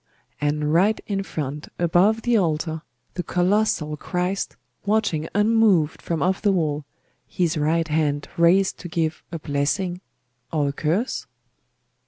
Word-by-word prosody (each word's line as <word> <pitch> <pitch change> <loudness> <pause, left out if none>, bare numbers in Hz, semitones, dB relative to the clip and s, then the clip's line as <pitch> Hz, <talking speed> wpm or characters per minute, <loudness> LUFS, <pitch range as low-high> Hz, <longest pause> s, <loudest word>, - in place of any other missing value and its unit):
And 150 +1 0
right 200 +6 +3
in 195 -2 -1
front, 150 -5 -5
above 185 +6 +3
the 240 -1 +2
altar, 160 -4 0 0.3
the 180 - -2
colossal 180 -3 +1
Christ 180 +5 -2 0.3
watching 200 -7 0
unmoved 210 -7 +3
from 165 -2 -2
off 185 +1 +1
the 205 - +3
wall, 150 -5 0 0.4
His 170 +1 0
right 160 +2 +1
hand 150 -2 0
raised 180 +3 +3
to 175 - -7
give 160 -2 -1
a 170 - -3
blessing 160 +5 -1 0.5
or 150 -3 +1
a - - -4
curse? 170 - -1
170 Hz, 135 wpm, -23 LUFS, 155-195 Hz, 0.5 s, right